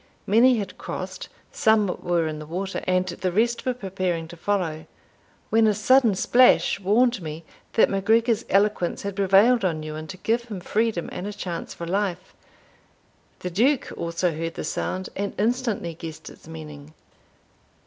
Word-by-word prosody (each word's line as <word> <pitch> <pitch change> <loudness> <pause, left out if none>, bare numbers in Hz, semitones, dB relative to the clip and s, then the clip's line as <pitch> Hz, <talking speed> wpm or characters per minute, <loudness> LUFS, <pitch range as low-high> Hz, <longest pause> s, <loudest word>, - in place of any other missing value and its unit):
Many 240 +5 +5
had 205 -3 -5
crossed, - - -6 0.2
some 220 -2 +3 0.2
were 175 -2 +1
in 155 -1 -4
the 155 - -9
water, 190 +4 -3
and 185 0 +2
the 185 +1 -2
rest 235 +6 0
were 255 - +1
preparing 185 -6 -3
to 175 - -9
follow, 165 -4 -2 0.6
when 225 0 +5
a 210 - +2
sudden 230 0 +4
splash 245 +2 +4
warned 220 +3 +2
me 155 0 -6 0.3
that 225 - +5
MacGregor's 225 +3 +2
eloquence 200 -3 +1
had 200 -1 -4
prevailed 200 +4 +4
on 160 -4 -1
Ewan 155 0 -6
to 185 - -8
give 230 +5 0
him 210 -5 -6
freedom 215 -1 -1
and 180 +3 -5
a - - -4
chance 180 -5 -5
for 170 - -6
life. 185 0 -2 1.1
The 180 - -4
Duke 250 +9 +2
also 170 0 -1
heard 165 +1 -4
the - - -4
sound, 185 0 -3
and 200 0 -3
instantly 225 -5 -1
guessed 160 -1 -9
its - - -17
meaning. 155 -1 -10
195 Hz, 160 wpm, -24 LUFS, 170-220 Hz, 1.1 s, Many